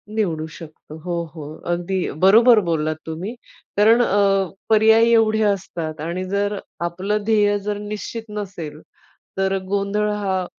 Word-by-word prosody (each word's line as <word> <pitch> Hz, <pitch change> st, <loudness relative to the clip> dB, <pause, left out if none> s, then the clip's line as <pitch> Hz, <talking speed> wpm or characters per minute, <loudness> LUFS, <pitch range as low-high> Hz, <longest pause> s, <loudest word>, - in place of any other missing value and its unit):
निवडू 165 Hz, -8 st, -1 dB
शकतो. 155 Hz, -1 st, -12 dB
हो, 170 Hz, +1 st, -3 dB
हो. 155 Hz, -3 st, -7 dB, 0.3 s
अगदी 175 Hz, +2 st, -1 dB, 0.3 s
बरोबर 225 Hz, +4 st, +7 dB
बोललात 155 Hz, -1 st, 0 dB
तुम्ही. 170 Hz, +7 st, -5 dB, 0.4 s
कारण 225 Hz, +4 st, +5 dB
अ, 195 Hz, -3 st, +2 dB, 0.2 s
पर्याय 220 Hz, +1 st, +5 dB
एवढे 220 Hz, -1 st, +3 dB
असतात 175 Hz, -6 st, -2 dB
आणि 170 Hz, +4 st, -3 dB
जर 200 Hz, +1 st, -1 dB, 0.3 s
आपलं 195 Hz, +5 st, -2 dB
ध्येय 205 Hz, -2 st, +3 dB
जर 205 Hz, +1 st, -3 dB
निश्चित 210 Hz, +2 st, -6 dB
नसेल, 185 Hz, -8 st, -6 dB, 0.6 s
तर 195 Hz, 0 st, +1 dB
गोंधळ 200 Hz, +2 st, 0 dB
हा, 195 Hz, -3 st, -1 dB
200 Hz, 130 wpm, -21 LUFS, 175-210 Hz, 0.6 s, बरोबर